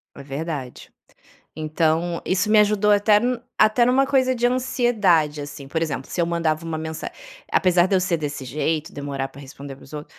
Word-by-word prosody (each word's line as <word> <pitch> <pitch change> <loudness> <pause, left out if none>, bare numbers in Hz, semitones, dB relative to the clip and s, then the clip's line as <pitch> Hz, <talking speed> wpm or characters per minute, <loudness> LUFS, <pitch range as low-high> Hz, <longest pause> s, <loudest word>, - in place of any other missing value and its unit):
É 140 - -10
verdade. 140 -2 -6 0.7
Então, 160 +2 0
isso 190 +3 0
me 215 0 +6
ajudou 210 0 +3
até 205 +1 +5
n 245 +1 -1 0.2
até 215 +3 +4
numa 260 +2 +3
coisa 260 -2 +2
de 245 -1 +1
ansiedade, 225 - +1
assim. 145 -1 -8
Por 160 +4 -2
exemplo, 145 -5 -3
se 175 - -1
eu - - +2
mandava 165 -2 -1
uma 165 -1 -4
mensa 160 0 -5 0.4
apesar 180 -1 +3
de 195 - +1
eu - - +4
ser 185 -1 0
desse 145 -3 -5
jeito, 155 +3 -2
demorar 140 -2 -4
pra 140 - -14
responder 140 0 -10
a - - -14
pessoa, 150 +2 -9
165 Hz, 190 wpm, -22 LUFS, 150-210 Hz, 0.7 s, me